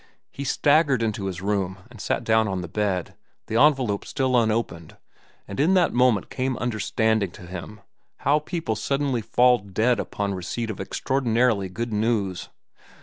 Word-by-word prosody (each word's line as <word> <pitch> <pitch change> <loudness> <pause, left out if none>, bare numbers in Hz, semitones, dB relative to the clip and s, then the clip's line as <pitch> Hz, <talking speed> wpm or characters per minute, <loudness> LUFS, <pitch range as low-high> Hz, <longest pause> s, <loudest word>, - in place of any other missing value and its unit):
He 140 - -6
staggered 145 -2 +3
into 105 -3 -2
his 95 -1 -4
room 100 -2 -1
and 115 -5 -11
sat - - -1
down 110 0 +3
on 95 -2 -2
the 90 - -5
bed, 95 -1 -2 0.3
the 110 - -4
envelope 130 -8 +3
still 130 -2 -1
unopened, 110 -8 0 0.5
and 100 - -6
in 170 +7 +4
that 180 -2 +3
moment 120 -5 +2
came 130 -1 -1
understanding 110 -2 0
to 90 - -11
him 95 +4 -8 0.4
how 145 +2 +3
people 155 -7 -3
suddenly 135 0 -1
fall 125 +3 +4
dead 110 +4 0
upon 100 -1 -2
receipt 110 +5 -3
of 105 - -9
extraordinarily 115 -3 0
good 115 +5 -4
news. 105 -4 -1
110 Hz, 155 wpm, -24 LUFS, 100-130 Hz, 0.5 s, in